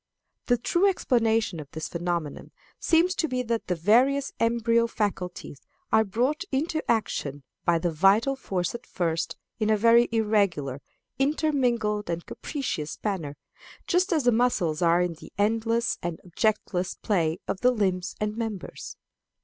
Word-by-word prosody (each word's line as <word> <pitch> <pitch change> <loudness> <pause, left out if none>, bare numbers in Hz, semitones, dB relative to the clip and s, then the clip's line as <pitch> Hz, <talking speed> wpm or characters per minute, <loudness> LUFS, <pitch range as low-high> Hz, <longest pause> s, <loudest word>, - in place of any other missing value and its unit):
The 245 - +3
true 345 +11 +2
explanation 225 - +1
of 145 -2 -9
the 160 - -5
phenomenon 170 -2 -3 0.3
seems 340 +3 +3
to 320 - +1
be 255 -3 -1
that 230 -1 -2
the 180 - 0
various 250 - +3
embryo 230 0 +2
faculties 185 - -4 0.3
are 220 0 +5
brought 245 - 0
into 310 +4 0
action 145 -11 -1 0.2
by 170 -1 +4
the 170 +1 -1
vital 195 - +3
force 185 -9 -2
at 235 +1 -8
first 165 -2 -2 0.2
in 215 -1 +1
a 215 - +4
very 235 +2 +5
irregular, 200 - +1 0.4
intermingled, 250 - +1
and 170 0 -3
capricious 210 - -4
manner, 165 -9 -3 0.5
just 365 +3 +1
as 315 -5 +2
the 245 - +4
muscles 215 -10 +1
are 170 +1 +4
in 175 -1 -2
the 165 - -14
endless 225 +3 +1
and 170 -1 -4
objectless 185 0 -1
play 170 -6 0
of 195 -1 -3
the 250 - +5
limbs 190 -6 -1
and 210 0 -2
members. 220 -5 -6
215 Hz, 150 wpm, -26 LUFS, 175-240 Hz, 0.5 s, are